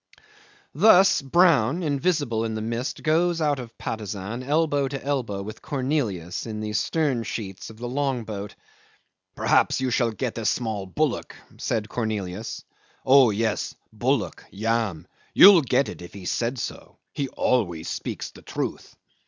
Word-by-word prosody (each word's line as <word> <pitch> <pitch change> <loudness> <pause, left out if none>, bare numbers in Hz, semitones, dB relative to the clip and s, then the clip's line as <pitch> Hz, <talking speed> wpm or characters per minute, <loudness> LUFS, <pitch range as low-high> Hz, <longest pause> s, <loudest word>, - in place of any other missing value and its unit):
'Thus 190 +3 +6
Brown, 160 0 +3
invisible 145 -6 0
in 110 -1 -2
the - - -2
mist, 115 +4 -3
goes 165 +2 +2
out 145 -3 +1
of 115 -2 -9
Patusan 105 +1 -5
elbow 145 0 +1
to 135 0 -6
elbow 120 -9 -2
with 110 +2 -8
Cornelius 125 - -2
in 110 -1 -5
the 105 0 -4
stern 145 -2 0
sheets 100 -4 -6
of 110 - -12
the 120 +2 -5
long 135 -1 -1
boat. 105 -2 -6 0.8
"Perhaps - - +2
you 130 -1 -1
shall 120 -1 +2
get 115 +1 -3
a 110 - -5
small 110 -5 -1
bullock," 145 +5 -1 0.2
said 110 -2 -1
Cornelius. 110 -3 -4 0.4
"Oh 130 -2 +7
yes. 110 +1 -1 0.2
Bullock. - - -1
Yam. 110 -5 -1 0.3
You'll 195 -3 +9
get 135 0 +1
it - - -8
if 90 +2 -11
he 95 -2 -9
said 120 +7 -1
so. 115 - -6 0.2
He 140 - -2
always 90 -12 0
speaks - - -4
the - - -15
truth. - - -5
120 Hz, 150 wpm, -25 LUFS, 110-140 Hz, 0.8 s, You'll